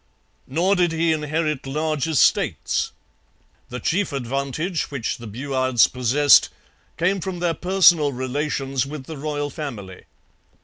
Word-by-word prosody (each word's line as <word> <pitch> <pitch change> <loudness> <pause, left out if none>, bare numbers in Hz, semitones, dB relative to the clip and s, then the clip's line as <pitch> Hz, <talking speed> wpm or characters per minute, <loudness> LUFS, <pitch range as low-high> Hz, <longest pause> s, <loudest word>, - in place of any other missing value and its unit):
Nor 175 +8 +1
did 175 -3 +1
he 165 0 +1
inherit 155 -2 -2
large 155 +1 -1
estates. 160 -4 +1 0.8
The 125 - -5
chief 185 +7 0
advantage 140 +6 -3
which 135 -5 -3
the 115 - -9
Buades 130 +1 +1
possessed 130 +4 +4 0.5
came 185 +3 +1
from 190 -1 -4
their 175 -1 0
personal 175 -5 +4
relations 135 0 -2
with 140 0 -7
the 160 +4 -8
royal 145 0 -3
family. 105 - -7
145 Hz, 125 wpm, -22 LUFS, 130-165 Hz, 0.8 s, possessed